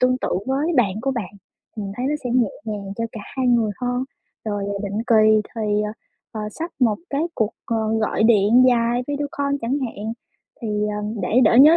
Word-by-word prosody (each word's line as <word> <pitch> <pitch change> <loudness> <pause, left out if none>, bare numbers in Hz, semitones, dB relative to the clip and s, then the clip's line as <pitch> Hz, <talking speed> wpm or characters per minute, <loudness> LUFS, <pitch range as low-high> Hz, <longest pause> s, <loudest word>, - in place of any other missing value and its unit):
Tương 255 0 +3
tự - - -2 0.2
với 280 +6 0
bạn 205 -7 +3
của 270 +3 0
bạn, 230 -9 -4 0.4
mình 200 -2 -4
thấy 250 - -1
nó 295 - +1
sẽ 245 - -1
nhẹ 240 -4 +3
nhàng 205 -3 -4
cho 230 - -1
cả 220 - -6 0.2
hai 260 - +1
người 235 -3 +3
hơn. 245 +1 -1 0.4
Rồi, 205 -2 -2
à, 200 0 -3
định 200 +2 -2
kỳ 215 -2 +5
thì, 210 -1 +1
ờ, 210 0 -3 0.4
ờ, 220 - -4
sắp 330 +10 -5
một 225 -4 +3
cái 280 +2 0
cuộc, 220 -2 +1 0.2
ờ, 230 - 0 0.2
gọi 215 - +1
điện 225 +2 +5
dài 240 0 +2
video 290 0 -2
call 280 0 +1
chẳng 245 +5 0
hạn, 225 -3 -4 0.5
thì, 230 - -4 0.3
ờm, 210 +1 -4
để 225 +7 +3
đỡ 215 - +5
nhớ 300 +6 +9
230 Hz, 210 wpm, -22 LUFS, 210-255 Hz, 0.5 s, nhớ